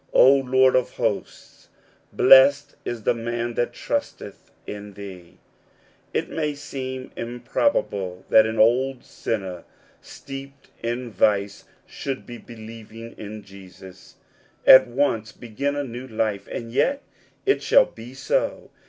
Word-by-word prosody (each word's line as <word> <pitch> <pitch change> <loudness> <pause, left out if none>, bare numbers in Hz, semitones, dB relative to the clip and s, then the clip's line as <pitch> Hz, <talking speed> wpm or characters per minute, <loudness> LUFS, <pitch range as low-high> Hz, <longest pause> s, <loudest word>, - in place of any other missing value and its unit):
" - - -31
O 135 - +8
Lord 130 -1 +3
of 130 -1 0
hosts, - - -4 0.4
blessed 140 +2 +6
is 120 -2 -5
thq 120 - +2
man 120 +1 -3
that 120 +1 -1
trusteth - - -5 0.2
in 105 0 -8
thee! 95 -4 -11 0.7
It - - -1
may 150 -2 -2
seem 130 -2 -6
im 120 +1 -6
probable 100 - -1
that 110 0 +7
on 110 0 -4
old 125 +3 +3
sinner, 95 -5 -4 0.4
steeped 135 0 -11
in 120 +1 -3
vice, 100 -1 +1 0.2
should 135 -1 -6
by 120 -1 -9
believing 115 0 -11
in 105 0 -8
Jesus, 95 -1 -14 0.5
at 130 - +9
once 120 -4 0
begin 130 +6 -4
a 145 - -2
new 125 0 -7
life; 110 -4 -2
and 115 -1 -6
yet 270 - +1 0.4
it 405 - +2
shall - - +5
be 120 +3 -12
so. - - -2
120 Hz, 135 wpm, -23 LUFS, 110-135 Hz, 0.7 s, at